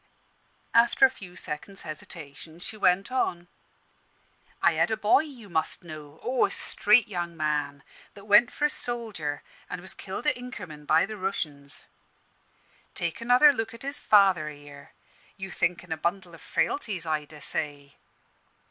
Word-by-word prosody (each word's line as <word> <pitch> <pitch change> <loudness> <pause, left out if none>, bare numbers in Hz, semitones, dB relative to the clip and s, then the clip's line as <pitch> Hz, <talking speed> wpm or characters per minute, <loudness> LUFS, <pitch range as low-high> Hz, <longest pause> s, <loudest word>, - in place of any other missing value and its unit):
After 235 +3 +6
a 260 - +3
few 185 -8 -12
seconds' 190 +6 -5
hesitation 155 0 -9
she 200 - -7
went 195 +2 +2
on 175 -9 -1 1.1
"I - - +5
had - - +2
a 220 - 0
boy, 215 +3 +5
you 275 -8 -7
must 165 0 -2
know 155 -2 -10
oh! 250 +1 +2
a - - -10
straight 210 +2 +4
young 175 -4 -4
man 145 -2 -1 0.3
that 200 0 -12
went 210 +3 +6
for 295 - 0
a - - +4
soldier, 215 - -3 0.3
an' 180 - -4
was 190 +2 -5
killed 190 +8 -7
at 295 - +3
Inkerman 180 -12 -9
by 160 +1 +5
the 215 +2 -7
Rooshians. 150 -7 -3 1.1
Take 170 +5 -1
another 250 +5 +6
look 225 -2 -3
at 230 - -13
his 280 +2 -1
father 190 -7 +4
here; 145 -1 -12 0.5
you 190 -1 -6
think 175 0 0
'en - - -14
a 160 - -1
bundle 175 +2 -2
o' 165 - -12
frailties, 200 - -1
I 155 -2 -1
dessay. 145 -1 -3
180 Hz, 155 wpm, -27 LUFS, 155-220 Hz, 1.1 s, After